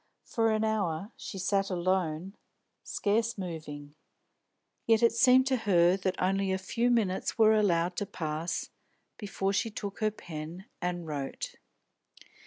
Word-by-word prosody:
For 225 -1 +1
an 215 0 +1
hour 205 -3 -1
she 195 - -7
sat 195 +1 +1
alone, 180 -1 -1 0.5
scarce 225 +2 0
moving. 155 -5 -6 0.9
Yet 225 0 +4
it 235 - +6
seemed 250 +3 +5
to 265 -1 +2
her 180 -5 +4
that 190 -1 -2
only 195 +1 +1
a 190 - +1
few 230 +6 0
minutes 210 -6 +1
were 220 -1 +6
allowed 180 -4 +2
to 205 - -2
pass 160 -2 -3 0.5
before 195 -2 -2
she 225 - +1
took 205 -2 -6
her 215 -1 +2
pen 170 -2 -8 0.2
and 175 -1 -2
wrote. 145 -3 -4
195 Hz, 140 wpm, -30 LUFS, 175-220 Hz, 0.9 s, it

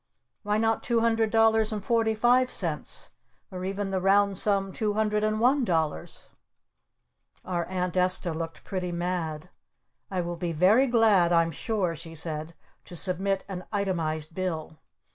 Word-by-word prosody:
Why 210 0 0
not 225 0 +1
two 235 -2 +1
hundred 225 -1 +2
dollars 225 0 +3
and 210 -2 -4
forty 225 -2 +2
five 250 +3 +3
cents? - - -4 0.4
Or 185 -1 -6
even 195 +1 -3
the 190 -1 -1
round 200 0 +3
sum 195 -2 +1
two 215 -2 -1
hundred 210 0 0
and 215 0 0
one 260 +4 +3
dollars?" 160 - -2 1.2
Our 175 -2 -2
Aunt 180 -1 -3
Esta 185 -1 +2
looked 165 0 -6
pretty 185 -2 -4
mad. 170 -3 -3 0.6
"I 185 -2 -1
will 175 0 -4
be 170 0 -3
very 200 - +4
glad 220 -8 +4
I'm 165 -1 +3
sure," 185 0 -2
she 165 +1 -9
said, 160 +1 -2 0.3
"to 175 - -11
submit 190 +2 -1
an 185 -2 -6
itemized 165 -6 -2
bill." 160 -4 -4
190 Hz, 155 wpm, -27 LUFS, 170-215 Hz, 1.2 s, very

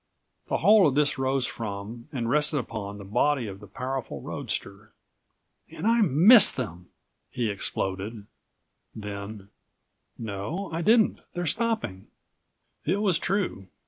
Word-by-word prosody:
The - - 0
whole 210 -5 +6
of 135 - 0
this 145 -1 +2
rose 130 0 +1
from, 110 +2 -6
and 125 -6 -2
rested 150 +4 +2
upon, 105 -5 -5
the 100 - -9
body 125 +6 +1
of 100 -2 -7
the 105 - -12
powerful 130 - -4
roadster. 100 - -5 0.8
"And - - -7
I 230 +1 +4
missed 200 - +7
them!" 90 -8 -5 0.4
he 120 -4 -1
exploded, 100 +2 -3 0.7
then: 100 -1 -7 0.7
"No, 115 - -4
I 165 - -1
didn't. 220 +4 +4 0.2
They're 175 0 -2
stopping." 220 - -1 0.8
It 200 - 0
was 190 -6 +2
true. 180 - -1
125 Hz, 130 wpm, -27 LUFS, 100-170 Hz, 0.8 s, missed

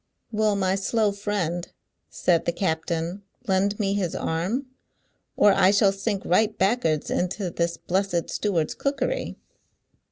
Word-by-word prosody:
"Will 215 -1 +2
my 190 -1 +1
slow 210 +2 +1
friend," 200 -4 -3 0.4
said 170 -2 +1
the - - +2
captain, 170 +1 -2 0.2
"lend 195 +2 +1
me 195 -2 +1
his 190 -4 -1
arm, 185 +12 -1 0.7
or 205 - +6
I 185 - +5
shall 200 0 +4
sink 195 0 -3
right 215 +4 +2
back'ards 190 -7 +1
into 180 +1 -1
this 170 0 -1
blessed 185 -2 -1
steward's 175 -7 0
cookery? 280 - -2
195 Hz, 130 wpm, -25 LUFS, 175-205 Hz, 0.7 s, or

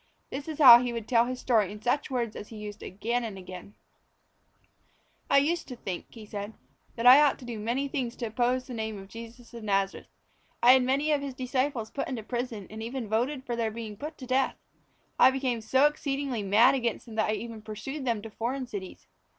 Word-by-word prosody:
This 275 +3 -5
is 315 -2 -5
how 245 -6 +10
he 250 -1 -2
would 230 -2 -5
tell 235 -1 +3
the 255 - -2
story 225 -6 +1
in 210 - -8
such 245 +6 0
words 240 -4 -2
as 210 - -7
he 225 - -11
used 210 0 -8
again 235 +6 -2
and 215 -4 -5
again: 185 +2 -10 1.5
"I - - +5
used 325 +5 +1
to 250 - -7
think," 190 -6 -6
he 225 -2 -12
said, 205 +1 -6 0.4
"that 230 - -4
I 255 +4 +10
ought 290 -2 +3
to 255 - -12
do 235 -3 -5
many 240 +6 -1
things 255 -4 -3
to 240 - -4
oppose 245 +3 0
the 255 - -8
name 220 -2 -4
of 195 0 -11
Jesus 230 +2 -11
of 235 -2 -8
Nazareth. 195 -2 -1 0.6
I 245 - +9
had 260 0 +6
many 275 +4 +1
of 290 -2 +2
His 275 -2 -5
disciples 255 -2 -2
put 280 - -3
into 245 -5 -4
prison 240 -3 -4
and 220 +1 -7
even 230 -1 -5
voted 255 +5 -1
for 240 - -2
their 230 -1 0
being 220 -1 -7
put 300 +8 -7
to 260 - -9
death. 260 +1 +1 0.6
I 255 - +8
became 260 -3 -1
so 260 +6 +3
exceedingly 280 -5 -1
mad 215 +6 +5
against 240 -4 -2
them 230 - -11
that 220 -1 0
I - - +2
even 225 0 -6
pursued 215 +7 -6
them 230 -5 -1
to 225 - -8
foreign 255 +5 -3
cities. 200 -6 -8
240 Hz, 220 wpm, -28 LUFS, 220-265 Hz, 1.5 s, how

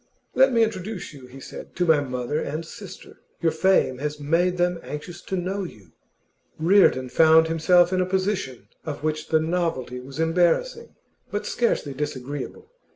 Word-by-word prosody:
'Let 265 0 +5
me 230 -2 +4
introduce 205 -4 -4
you,' 135 -3 -12
he 130 +2 -12
said, - - -10
'to 180 - +1
my 160 -3 +5
mother 130 +1 -2
and 160 +2 -4
sister. 190 +3 -11 0.2
Your 165 -2 +2
fame 160 -7 +2
has 150 +1 -3
made 170 +5 +1
them 175 -1 +1
anxious 160 +4 -8
to 190 - -4
know 190 +3 -2
you.' 100 - -11 0.7
Reardon 160 -6 +4
found 160 +4 +5
himself 175 +2 +4
in 185 - +2
a - - +1
position 185 - -2 0.2
of 150 -2 -6
which 155 0 -2
the 160 - +3
novelty 160 -7 -2
was 135 +4 -10
embarrassing, 175 - +1 0.3
but 205 - -3
scarcely 195 - 0
disagreeable. 145 - -6
165 Hz, 160 wpm, -24 LUFS, 145-185 Hz, 0.7 s, Let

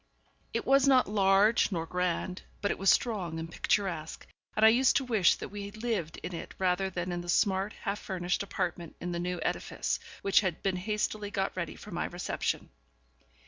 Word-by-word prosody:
It - - -2
was 275 0 +5
not 260 -2 +5
large 205 +2 +4
nor 165 -3 -1
grand, 180 +1 -2 0.2
but 205 - 0
it - - -3
was 195 0 +3
strong 190 -9 +1
and 165 +1 -5
picturesque, 175 -7 -1 0.3
and 215 - +5
I - - +10
used 255 +3 +4
to 275 - +3
wish 220 -8 +4
that - - -7
we 200 0 -6
lived 215 -6 -3
in 180 - -5
it 165 - -7
rather 190 +1 +1
than 180 0 -3
in 175 0 -2
the 175 - -8
smart, 195 +2 +2
half 205 -1 -4
furnished 180 -1 -2
apartment 180 -4 -3
in 175 - -4
the 170 - -2
new 180 +1 -2
edifice, - - -1 0.2
which 195 +1 +5
had 185 -5 -2
been 190 -2 +1
hastily 210 +1 -2
got 195 -1 -2
ready - - -3
for - - -11
my - - -2
reception. - - -3
195 Hz, 190 wpm, -30 LUFS, 180-210 Hz, 0.3 s, I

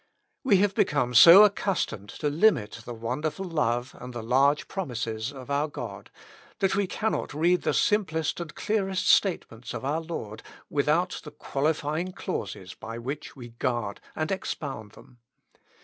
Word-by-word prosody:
We 240 -8 +5
have 200 +1 +2
become 140 -8 +1
so 170 - +10
accustomed 190 - 0
to 150 - -3
limit 150 - +2
the 120 - -6
wonderful 145 +11 -3
love 125 -7 -1
and 125 0 -8
the 120 -2 -5
large 135 +5 +2
promises 120 - -3
of 135 -1 -9
our 145 +2 +1
God, 145 - -8 0.5
that 195 -3 +1
we 200 -1 +1
cannot 215 -7 -2
read 175 +4 +3
the - - 0
simplest 160 -8 +1
and 165 -3 -7
clearest 195 -3 -1
state 190 -4 +4
ments 115 +1 -8
of - - -5
our 150 +4 0
Lord 135 -10 -6 0.3
without 155 +5 +1
the 150 - -8
qualifying 155 +5 -2
clauses - - -5
by 115 +1 -8
which 135 +5 -6
we 120 -3 -10
guard 120 -3 -3
and 155 +2 -2
expound 135 - -4
them. 125 -2 -18
150 Hz, 155 wpm, -27 LUFS, 120-180 Hz, 0.5 s, so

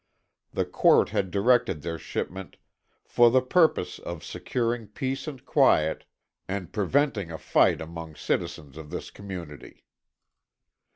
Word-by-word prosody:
The - - -1
court - - +4
had 95 - -1
directed 115 - +2
their 85 0 -4
shipment 95 0 -5 0.5
"for 120 0 +5
the 130 +2 +5
purpose 160 +6 +2
of 85 -3 -7
securing 120 -2 -2
peace 130 +6 -4
and 135 -5 -7
quiet 80 +1 +3 0.4
and 95 -3 -4
preventing 105 - +1
a 80 - -5
fight - - +3
among 80 -1 -8
citizens 75 -1 -3
of 80 -2 -9
this 90 - -6
community." 90 -7 -9
95 Hz, 125 wpm, -26 LUFS, 80-120 Hz, 0.5 s, for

